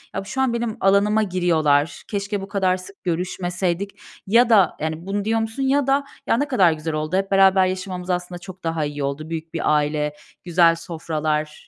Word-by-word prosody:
"Ya, - - -2
şu 265 +7 -3
an 260 -3 +1
benim 235 -2 -2
alanıma 205 +3 +3
giriyorlar. 165 -5 +1
Keşke 200 -1 -3
bu 195 - -7
kadar 190 -2 +1
sık 190 +2 -14
görüşmeseydik." 180 +2 -2 0.3
ya 235 +4 +4
da, 200 -7 +4
yani, 160 +2 -4
bunu 200 +1 -2
diyor 225 +1 +1
musun? 225 +4 -3
Ya 275 +1 +2
da, 275 +1 +2 0.2
"Ya, - - +3
ne 290 - 0
kadar 190 -11 +4
güzel 155 0 -4
oldu. 155 +3 -2
Hep 195 0 -2
beraber 195 -1 +5
yaşamamız 185 -1 -4
aslında 180 0 -2
çok 185 +1 -11
daha 165 -2 -1
iyi 145 -1 -4
oldu. 140 +3 -4
Büyük 165 0 -6
bir 155 -2 +1
aile, 150 0 0 0.3
güzel 170 -1 +4
sofralar." 155 -2 -3
185 Hz, 190 wpm, -22 LUFS, 160-200 Hz, 0.3 s, beraber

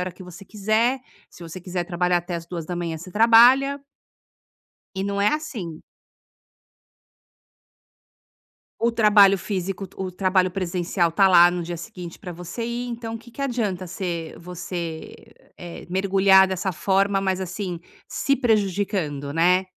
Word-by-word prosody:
hora 180 -1 -3
que 185 - -13
você 180 +2 -12
quiser. 220 +6 0 0.3
Se 175 - -15
você 170 +2 -8
quiser 180 0 -4
trabalhar 180 0 0
até 175 0 -6
às 165 - -8
2h 170 -2 -6
da 175 - -4
manhã, 170 -2 -3
você 175 +3 -10
trabalha 245 +6 +5 1.2
e 190 - -2
não 200 0 -2
é 205 - +3
assim. 235 - -5 3.0
O 235 +1 +2
trabalho 205 -3 +5
físico, 190 0 -4
o 185 -1 -5
trabalho 185 0 +1
presencial 175 -1 -1
está 195 +4 +4
lá 175 -2 +7
no 175 -1 -3
dia 170 +1 -5
seguinte 170 +1 -9
para 180 -4 -8
você 175 +7 -6
ir. 240 +1 -4
Então, 230 -1 -5
o - - -5
que 235 +1 -16
que 275 - -8
adianta 210 -9 -2
ser 170 -3 -5
você, 175 -2 -6 0.4
eh, 175 -1 -9
mergulhar 190 +1 +4
dessa 190 +1 -2
forma, 195 +3 +1
mas, 190 -1 -1
assim, 185 -1 -5 0.3
se 275 - 0
prejudicando, 195 - -1
né? 180 +4 +3
190 Hz, 150 wpm, -23 LUFS, 175-210 Hz, 3.0 s, lá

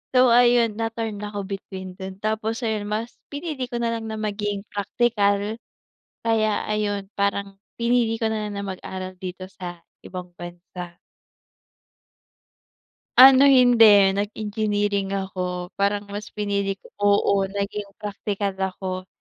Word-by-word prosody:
So, 250 -1 +6
ayun 240 -2 +5
na 225 0 0
torn 225 -3 -4
ako 205 -1 -4
between 190 -2 -7
dun. 190 0 -7
Tapos, 220 +2 -2
ayun 215 -2 -1
mas 225 +3 -3
pinili 285 -4 -4
ko 240 - -5
nalang 230 -1 -1
na 220 - -4
maging 205 -1 -2
praktikal, 205 0 +1 0.7
kaya 220 -2 +2
ayun 205 -2 -1
parang, 200 -1 -1 0.2
pinili 235 -1 +2
ko 225 - +2
nalang 210 -1 -3
na 200 - -3
mag-aral 185 0 -6
dito 185 0 -6
sa 175 -2 -8 0.2
ibang 180 -1 -7
bansa. 175 0 -8 2.2
Ano, 265 +1 +10
hindi, 230 -7 +7
nag 205 +2 -2
engineering 205 -2 -1
ako, 180 -2 -3
parang 200 +1 +1
mas 205 +1 -7
pinili 200 -2 -1
ko, 195 - -19
oo, 200 -1 +3
naging 200 +1 -3
praktikal 205 -1 -3
ako. 185 -1 -3
205 Hz, 130 wpm, -24 LUFS, 195-225 Hz, 2.2 s, Ano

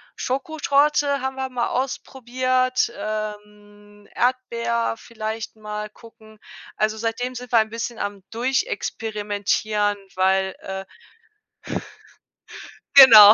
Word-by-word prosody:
Schokotorte 285 0 +1
haben 265 0 -2
wir 265 0 -2
mal 245 -2 -1
ausprobiert, 255 -1 0
ähm, 210 -1 -7
Erdbeer 235 -2 0
vielleicht 220 -1 -6
mal 210 0 -6
gucken. 220 -1 -17 0.4
Also, 215 +1 0
seitdem 230 +3 -2
sind 250 0 -8
wir 235 - +5
ein 220 -1 +3
bisschen 230 0 -4
am 205 -2 -4
Durchexperimentieren, 215 - -1 0.2
weil 190 0 +2
äh 190 0 -6 2.1
Genau. 220 -6 +12
225 Hz, 95 wpm, -23 LUFS, 210-255 Hz, 2.1 s, Genau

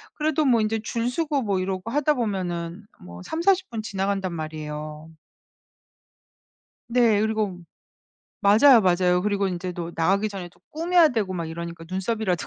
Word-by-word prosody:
그래도 310 0 0
뭐 240 -4 +4
인제 215 +1 0
줄 230 +1 -1
서고 295 0 -1
뭐 200 -5 0
이러고 190 +3 -3
하다 295 +2 +2
보면은 185 - -3 0.2
뭐 85 0 -11
30-40 375 +3 +1
분 225 -2 -4
지나간단 195 -2 -2
말이에요. 155 -1 -6 1.8
네. 235 -3 +3
그리고 215 -4 -1 0.8
맞아요, 225 +5 +7
맞아요. 180 -1 +2
그리고 200 -1 0
인제 180 0 -4
또 170 -1 -5
나가기 195 +6 +1
전에 190 -3 -7
또 - - -27
꾸며야 335 +1 +4
되고 220 -8 -1
막 170 -3 -3
이러니까 170 0 -7
눈썹이라도 190 -2 -1
200 Hz, 315 characters per minute, -24 LUFS, 175-230 Hz, 1.8 s, 맞아요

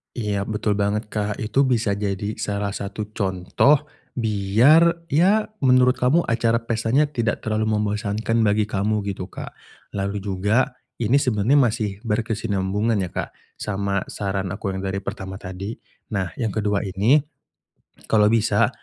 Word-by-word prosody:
Iya, 105 -4 -2
betul 105 -1 -1
banget 105 +1 -1
Kak. 105 -1 -3
Itu 115 +6 +2
bisa 115 -6 +1
jadi 100 +1 -3
salah 100 0 -2
satu 100 +2 -5
contoh 100 +9 +2 0.3
biar, 125 - +3
ya, 195 +9 +3
menurut 125 -3 +4
kamu 140 +8 +3
acara 115 0 +2
pestanya 115 +6 +1
tidak 115 -6 -1
terlalu 110 0 0
membosankan 105 +2 -1
bagi 105 +1 +2
kamu 105 +1 0
gitu, 95 -1 -4
Kak. 95 - -9 0.3
Lalu 100 0 -3
juga 105 +7 +1 0.3
ini 120 +5 +3
sebenernya 125 +1 +2
masih 110 -6 +1
berkesinambungan, 105 -1 0
ya, 90 - -3
Kak. - - -5 0.2
Sama 100 -1 -2
saran 95 -2 -3
aku 100 0 -4
yang 95 0 -4
dari 95 +1 -2
pertama 95 0 -6
tadi. 95 +4 -6 0.4
Nah, 95 -4 -1
yang 110 -4 -1
kedua 105 -1 0
ini 100 +9 +3 0.9
kalau 105 -1 +4
bisa 115 0 +3
105 Hz, 140 wpm, -23 LUFS, 100-115 Hz, 0.9 s, menurut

